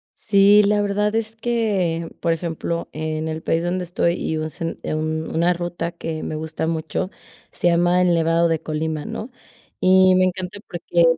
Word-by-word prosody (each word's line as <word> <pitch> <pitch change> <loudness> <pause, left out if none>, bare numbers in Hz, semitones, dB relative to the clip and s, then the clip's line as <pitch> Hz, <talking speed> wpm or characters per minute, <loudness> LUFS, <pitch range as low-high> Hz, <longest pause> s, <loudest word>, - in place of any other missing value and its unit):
Sí, 205 0 +5
la 205 0 +2
verdad 210 +1 0
es 225 0 -1
que 205 -8 0
Por 165 - +1
ejemplo, 170 0 -3
en 155 0 -3
el 160 0 -4
país 165 +1 0
donde 180 +1 -1
estoy, 170 -1 0
y 160 -2 -2
un 155 0 -3
sen 165 +3 -5
un 155 +1 -2
una 170 +2 +3
ruta 175 -1 -4
que 165 -2 -5
me - - -4
gusta 160 +1 -3
mucho, 165 +3 -2 0.4
se 175 - -1
llama 175 +1 +3
el 180 -1 +3
Nevado 165 0 +3
de 165 -2 0
Colima, 155 -1 -3
¿no?, 225 +2 -6 0.5
y 185 0 +6
me 185 0 +4
encanta 185 +1 -3
porque 175 0 0
170 Hz, 175 wpm, -22 LUFS, 160-185 Hz, 0.5 s, y